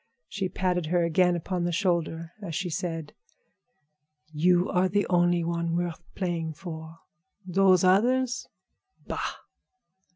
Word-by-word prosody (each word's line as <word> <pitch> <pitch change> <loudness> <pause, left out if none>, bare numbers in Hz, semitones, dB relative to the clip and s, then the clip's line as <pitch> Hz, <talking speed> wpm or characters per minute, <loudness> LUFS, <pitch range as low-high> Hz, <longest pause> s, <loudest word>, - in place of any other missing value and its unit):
She 195 -2 -3
patted 180 -2 -1
her 175 +1 +2
again 175 +2 +3
upon 175 +1 -2
the 175 - 0
shoulder 170 -3 -1
as 170 -6 -5
she 180 +1 -2
said: 165 -2 -4 1.2
"You 175 +4 +3
are 185 0 +2
the 205 +2 +1
only 175 -1 +3
one 170 0 -1
worth 175 -1 -2
playing 170 -4 -2
for. 160 0 -8 0.5
Those 185 0 +4
others? 245 +7 +3 0.6
Bah!" - - -3
175 Hz, 125 wpm, -27 LUFS, 165-185 Hz, 1.2 s, Those